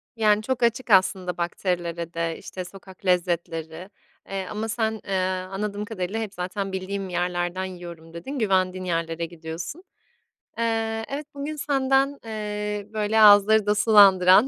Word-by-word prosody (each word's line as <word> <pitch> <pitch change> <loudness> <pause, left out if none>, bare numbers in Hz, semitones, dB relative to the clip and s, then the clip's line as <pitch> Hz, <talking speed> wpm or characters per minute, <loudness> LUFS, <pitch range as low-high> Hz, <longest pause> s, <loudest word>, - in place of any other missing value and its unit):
Yani, 215 -2 +3
çok 245 +2 -2
açık 235 +2 +1
aslında 185 -2 +3
bakterilere 170 -1 -2
de, 165 -1 -2
işte, 185 -1 -7
sokak 190 +1 -14
lezzetleri, 170 -1 -1 0.4
eee, 195 -1 -3
ama 215 +1 -3
sen, 220 -1 -1
eee, 195 - -5 0.4
anladığım 205 +1 -3
kadarıyla 205 -1 -3
hep 215 -3 -4
zaten, 190 +2 -4
"Bildiğim 190 0 -4
yerlerden 175 +1 -1
yiyorum." 170 -3 -9
dedin, 260 +12 -6
güvendiğin 185 -3 +1
yerlere 165 -1 -1
gidiyorsun. 170 - -7 0.7
Eee, 225 -1 -1
evet 285 +2 -4
bugün 285 +2 -4
senden, 275 -1 +1
eee, 210 -1 -4
böyle, 215 0 +1
ağızları 210 +1 +7
da 210 0 +2
sulandıran, 200 0 +7
195 Hz, 135 wpm, -25 LUFS, 180-220 Hz, 0.7 s, ağızları